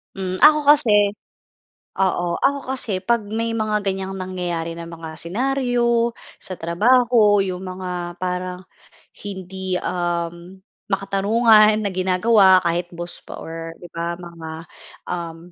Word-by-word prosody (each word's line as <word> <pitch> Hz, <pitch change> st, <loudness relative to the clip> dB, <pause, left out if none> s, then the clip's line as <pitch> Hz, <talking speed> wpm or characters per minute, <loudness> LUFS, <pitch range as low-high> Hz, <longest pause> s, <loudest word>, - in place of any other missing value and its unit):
Hmm, 185 Hz, -1 st, -3 dB
ako 300 Hz, 0 st, +7 dB
kasi 220 Hz, -9 st, +5 dB, 0.9 s
oo, 175 Hz, -2 st, 0 dB
ako 280 Hz, 0 st, +3 dB, 0.2 s
kasi 215 Hz, -7 st, -1 dB
'pag 230 Hz, +5 st, 0 dB
may 230 Hz, +1 st, -2 dB
mga 215 Hz, -1 st, 0 dB
ganiyang 190 Hz, 0 st, -3 dB
nangyayari 175 Hz, -3 st, -4 dB
ng 170 Hz, 0 st, -8 dB
mga 165 Hz, -1 st, -8 dB
senaryo 235 Hz, +5 st, 0 dB, 0.2 s
sa 185 Hz, -, -8 dB
trabaho, 215 Hz, +4 st, +4 dB
'yong 185 Hz, -1 st, -2 dB
mga 180 Hz, -2 st, -5 dB
parang 180 Hz, 0 st, -4 dB, 0.6 s
hindi, 190 Hz, -1 st, -4 dB
uhm, 175 Hz, +1 st, -3 dB, 0.3 s
makatarungan 215 Hz, +2 st, +4 dB
na 205 Hz, -, -1 dB
ginagawa 190 Hz, +1 st, +4 dB
kahit 170 Hz, 0 st, 0 dB
boss 175 Hz, +1 st, -7 dB
pa -, -, -9 dB
or 165 Hz, 0 st, -7 dB
'di 175 Hz, -, -10 dB
ba, 170 Hz, 0 st, -3 dB
mga, 170 Hz, -2 st, -9 dB, 0.6 s
uhm, 170 Hz, -2 st, -4 dB
185 Hz, 125 wpm, -21 LUFS, 175-215 Hz, 0.9 s, ako